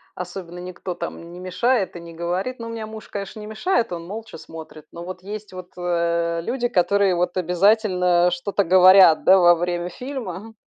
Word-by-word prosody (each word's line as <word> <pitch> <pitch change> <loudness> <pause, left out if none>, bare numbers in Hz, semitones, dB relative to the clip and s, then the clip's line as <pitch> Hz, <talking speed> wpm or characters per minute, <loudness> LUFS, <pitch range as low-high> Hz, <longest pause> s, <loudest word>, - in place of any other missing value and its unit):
особенно 180 -1 -7
никто 180 0 -6
там 170 0 -7
не 175 - -10
мешает 185 +3 0
и - - -6
не 170 0 -11
говорит. 180 +9 -3
Ну, 230 - -6
у - - -7
меня 225 -1 -5
муж, 220 0 -10
конечно, 200 +1 -7
не 210 - -8
мешает, 225 - -1
он 170 -1 -6
молча 220 +2 -8
смотрит. 155 -1 -11
Но 170 0 -9
вот 185 0 -8
есть 210 0 -8
вот, 185 -1 -9
э, 170 -1 -1
люди, 245 +2 -1
которые 195 -1 +2
вот 175 +1 -1
обязательно 180 -1 +3
что-то 195 +3 -1
говорят, 185 -2 +7
да, 190 +1 +7
во 175 -1 +6
время 175 +1 -2
фильма, 225 -4 -7
180 Hz, 185 wpm, -22 LUFS, 175-210 Hz, -, говорят